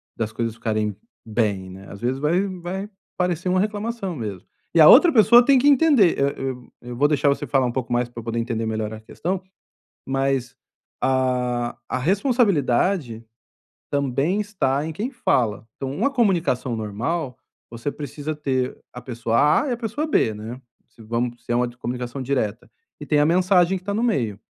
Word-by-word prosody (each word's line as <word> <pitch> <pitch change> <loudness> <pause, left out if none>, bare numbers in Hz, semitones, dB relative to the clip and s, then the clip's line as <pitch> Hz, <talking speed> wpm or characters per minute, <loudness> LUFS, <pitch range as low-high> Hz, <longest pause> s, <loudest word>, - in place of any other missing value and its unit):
das 110 -1 -3
coisas 115 -1 -3
ficarem 110 -3 -2 0.3
bem, 105 -4 -1
né? 95 +1 -11
Às 100 - -10
vezes 125 +3 -1
vai 170 +7 +1
vai 185 +2 -5 0.3
parecer 180 0 -1
uma 185 0 +2
reclamação 210 -2 -2
mesmo. 105 -7 -6 0.3
E 170 - +3
a 155 - +9
outra 330 +7 +8
pessoa 235 -1 +7
tem 275 -2 +5
que 285 - +2
entender. 275 - +5
Eu 140 0 +2
eu 130 -3 -6
eu 120 0 -8
vou 145 +4 +3
deixar 145 -1 +1
você 140 - +1
falar 135 -3 +2
um 120 - -1
pouco 125 -3 -3
mais 120 0 +1
pra 120 -1 -9
eu - - -14
poder 115 0 -2
entender 115 -1 -2
melhor 110 -1 -3
a 110 - -9
questão, 180 +11 -4 0.6
mas 135 -2 -1 0.4
a 125 -2 0
a 130 - -2
responsabilidade 180 - +1 0.7
também 140 +7 0
está 150 -9 -1
em 160 - -4
quem 215 - -4
fala. 120 - 0
Então 135 -1 -4
uma 275 - +1
comunicação 175 - +1
normal, 125 +7 -3 0.3
você 115 +5 -4
precisa 150 +1 -5
ter 130 -3 -2
a 125 - -9
pessoa 115 -2 -1 0.2
A 290 - -3
e - - -1
a 240 - -1
pessoa 240 +6 -3
B, 110 - +2
né? 110 +4 -8 0.3
Se 115 - -19
vamos 120 +2 -3
se - - -6
é - - +2
uma 125 0 +1
comunicação 125 +2 -5
direta. 125 -5 -2 0.3
E - - -7
tem 150 - +2
a 145 - +4
mensagem 180 +2 +3
que 185 - -13
tá 200 +1 -3
no 225 - 0
meio. 120 - 0
135 Hz, 185 wpm, -23 LUFS, 120-185 Hz, 0.7 s, a